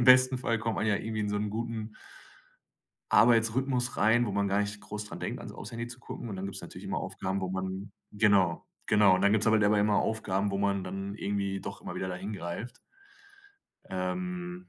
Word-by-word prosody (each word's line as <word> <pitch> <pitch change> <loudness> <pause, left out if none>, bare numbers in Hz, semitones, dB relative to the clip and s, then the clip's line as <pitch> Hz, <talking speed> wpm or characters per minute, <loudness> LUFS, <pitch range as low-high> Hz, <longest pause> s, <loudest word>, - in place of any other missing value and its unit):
im - - +3
besten 130 0 +7
Fall 115 -2 0
kommt 115 0 -1
man - - 0
ja 105 -2 +3
irgendwie 110 0 -3
in 105 - -1
so 105 - 0
'n 105 0 -1
guten 115 0 -3 1.2
Arbeitsrhythmus 120 +2 +3
rein, 120 +2 +4
wo 105 - -2
man 100 0 +1
gar 100 - +2
nicht 105 0 -3
groß 105 0 -6
daran - - -8
denkt - - -3
an's - - -8
auf's - - -8
Handy 115 0 -4
zu 120 +1 -10
gucken. 120 - -7
Und 100 - -5
dann 95 - -4
gibt’s 100 - -5
natürlich - - -10
immer - - -2
Aufgaben, 95 +1 -3
wo 95 - -2
man 95 +1 -4 0.2
genau, 100 -5 +3 0.2
genau. 105 -3 +6
Und 95 - 0
dann 100 0 +5
gibt’s 110 0 +2
halt 110 -1 +5
aber 105 0 +4
immer 105 0 +3
Aufgaben, 100 -3 0
wo 100 - -1
man 100 -1 +1
dann 95 +1 -5
irgendwie 100 -2 -2
doch - - -7
immer - - -6
wieder 95 - -3
da 90 - -3
hin 95 +4 -5
greift. 100 +6 -5 1.1
Ähm, 180 - -4
105 Hz, 215 wpm, -30 LUFS, 100-115 Hz, 1.2 s, besten